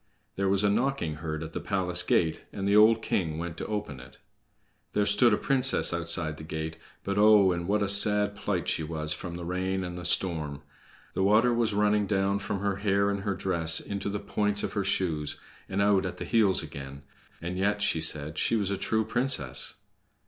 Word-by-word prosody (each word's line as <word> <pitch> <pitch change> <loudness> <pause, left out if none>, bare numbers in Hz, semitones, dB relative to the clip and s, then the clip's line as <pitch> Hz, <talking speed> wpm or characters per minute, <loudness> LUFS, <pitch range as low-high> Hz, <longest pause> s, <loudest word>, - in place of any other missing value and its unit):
There 100 0 0
was 100 +1 +1
a 105 - +3
knocking 115 - -1
heard 80 0 -4
at 80 +1 -8
the - - -3
palace 90 -3 0
gate, 80 -2 +1
and 100 0 -4
the 100 - +3
old 110 +1 +5
king 80 -8 -1
went 85 0 -5
to - - -5
open 105 -11 -4
it. - - -14 0.8
There 105 - +2
stood 105 +4 +4
a 105 - +3
princess 135 -7 +1
outside 85 -2 -1
the - - -9
gate; 80 0 -5 0.2
but 100 +1 -1
oh, 105 -3 +6
in 85 0 -3
what 105 +1 +1
a - - 0
sad 105 0 +2
plight 95 -3 -2
she - - 0
was 75 -1 -3
from 85 -1 -7
the 85 -1 -6
rain 95 +2 -2
and 90 0 -6
the - - -8
storm! 80 -5 0 0.5
The - - -2
water 110 +5 +4
was 115 -3 0
running 105 0 +2
down 100 0 +1
from 100 -1 -4
her 100 -1 -1
hair 100 0 +1
and 100 - -2
her 100 -1 -2
dress 85 -4 0
into 100 0 -4
the 100 +1 -3
points 105 0 -1
of - - -3
her 100 - -1
shoes 85 -6 -1 0.3
and 100 +1 0
out 100 -2 +3
at 90 - -7
the - - -5
heels 110 -5 +5
again. 70 0 -9 0.4
And 85 +2 -5
yet 100 +2 0
she 85 -5 +1
said 75 0 -1
she - - +2
was 100 -3 -1
a 100 - -1
true 110 +3 0
princess! 110 - -1
95 Hz, 210 wpm, -28 LUFS, 85-105 Hz, 0.8 s, oh